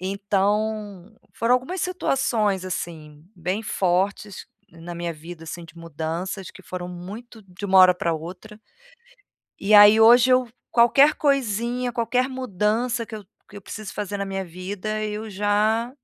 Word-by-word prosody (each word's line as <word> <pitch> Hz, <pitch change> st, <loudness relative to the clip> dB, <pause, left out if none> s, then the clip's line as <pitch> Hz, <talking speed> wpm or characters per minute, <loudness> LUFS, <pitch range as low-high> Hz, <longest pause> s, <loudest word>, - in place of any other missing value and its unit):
Então 205 Hz, +1 st, -2 dB, 0.2 s
foram 230 Hz, +2 st, +2 dB
algumas 265 Hz, +9 st, -2 dB
situações 230 Hz, -, 0 dB
assim 160 Hz, -4 st, -6 dB
bem 185 Hz, +4 st, -3 dB
fortes 195 Hz, 0 st, -1 dB, 0.2 s
na 170 Hz, +1 st, -9 dB
minha 170 Hz, 0 st, -4 dB
vida 165 Hz, +2 st, -11 dB
assim 170 Hz, +1 st, -8 dB
de 165 Hz, -, -16 dB
mudanças 165 Hz, +4 st, -5 dB
que 190 Hz, -, -14 dB
foram 180 Hz, -1 st, -6 dB
muito 205 Hz, +6 st, -10 dB
de 190 Hz, +1 st, -11 dB
uma 190 Hz, -1 st, +4 dB
hora 185 Hz, 0 st, +8 dB
pra 170 Hz, -2 st, -2 dB
outra, 185 Hz, +7 st, -9 dB, 1.0 s
e 200 Hz, +2 st, 0 dB
aí 205 Hz, +1 st, +9 dB
hoje 240 Hz, +3 st, +7 dB
eu 255 Hz, -1 st, +3 dB, 0.2 s
qualquer 270 Hz, +5 st, +5 dB
coisinha, 245 Hz, -3 st, 0 dB
qualquer 245 Hz, +2 st, 0 dB
mudança 235 Hz, -1 st, -1 dB
que 225 Hz, -, -9 dB
eu 210 Hz, -, -10 dB, 0.2 s
que 205 Hz, -, -13 dB
eu 200 Hz, -, -10 dB
preciso 215 Hz, +1 st, -8 dB
fazer 205 Hz, -1 st, -4 dB
na 200 Hz, -, -2 dB
minha 195 Hz, 0 st, -4 dB
vida 195 Hz, +5 st, -5 dB
eu 215 Hz, +1 st, -4 dB
já 210 Hz, +4 st, +1 dB
205 Hz, 150 wpm, -23 LUFS, 180-230 Hz, 1.0 s, aí